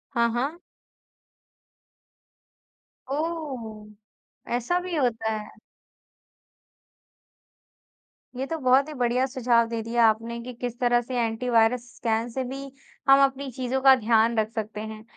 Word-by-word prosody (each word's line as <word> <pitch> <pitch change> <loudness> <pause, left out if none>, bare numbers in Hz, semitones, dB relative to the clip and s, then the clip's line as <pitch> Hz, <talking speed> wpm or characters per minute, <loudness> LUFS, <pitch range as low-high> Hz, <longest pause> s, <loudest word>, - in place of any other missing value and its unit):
हाँ, 235 0 +3
हाँ। 275 +9 -2 2.5
ओह! 275 -9 -4 0.7
ऐसा 250 +9 0
भी 360 -1 -4
होता 225 -5 0
है? 210 -1 -7 2.8
ये 265 +2 -3
तो 325 +3 -3
बहुत 260 +2 +4
ही - - -6
बढ़िया 250 -1 +1
सुझाव 245 -3 +2
दे 230 0 -3
दिया 235 +1 +2
आपने 225 +2 -1
कि 250 +1 -8
किस 245 0 -6
तरह 240 -1 +3
से 245 +1 -3
एंटी 230 +2 -1
वायरस 230 +1 +3
स्कैन 225 0 -1
से 260 +3 -3
भी 265 +2 -6 0.5
हम 275 - +8
अपनी 270 0 0
चीज़ों 260 +1 -2
का 270 0 +8
ध्यान 230 -1 +2
रख 215 0 0
सकते 215 -1 -4
हैं। 220 0 -8
240 Hz, 130 wpm, -25 LUFS, 225-265 Hz, 2.8 s, हम